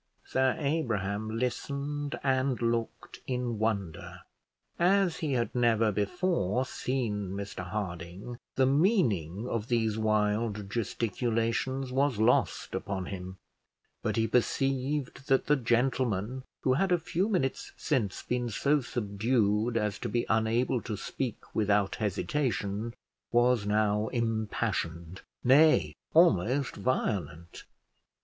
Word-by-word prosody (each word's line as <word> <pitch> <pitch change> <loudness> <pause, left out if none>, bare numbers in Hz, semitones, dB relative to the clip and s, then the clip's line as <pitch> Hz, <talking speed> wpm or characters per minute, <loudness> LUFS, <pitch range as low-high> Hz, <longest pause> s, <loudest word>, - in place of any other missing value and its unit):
Sir 130 -1 +2
Abraham 110 -8 -1
listened 140 +4 -3
and 130 -1 +1
looked 115 0 -2
in 125 -3 -2
wonder. 100 -7 -2 0.6
As 185 0 +3
he 150 -4 -1
had 120 -4 0
never 115 -3 +3
before 130 - 0
seen 110 -8 -2
Mr 100 -2 -5
Harding, 95 +3 -5 0.2
the 130 - +4
meaning 125 - +2
of 115 -3 -2
these 110 -3 +1
wild 105 -1 0
gesticulations 120 +3 -1
was 135 -2 +1
lost 110 +3 +2
upon 95 -2 -3
him; 95 0 -7 0.6
but - - -1
he 115 0 +2
perceived 135 +3 0
that 135 -1 +3
the 150 - +4
gentleman 125 -2 0 0.2
who 130 - +3
had 185 +7 +1
a 175 - +5
few 180 +4 -1
minutes 155 -11 -1
since 115 -11 -1
been 125 -1 -1
so 145 +7 +2
subdued 110 0 0
as 105 -2 -1
to 120 - -3
be 120 +3 0
unable 115 +2 +2
to 105 - -4
speak 125 +2 -5
without 105 -2 +1
hesitation, 110 0 -1 0.4
was 120 -3 +3
now 105 0 +2
impassioned, 105 -7 -2 0.2
nay, 150 +5 +5 0.2
almost 135 - +4
violent. 85 -9 -2
115 Hz, 115 wpm, -29 LUFS, 105-130 Hz, 0.6 s, a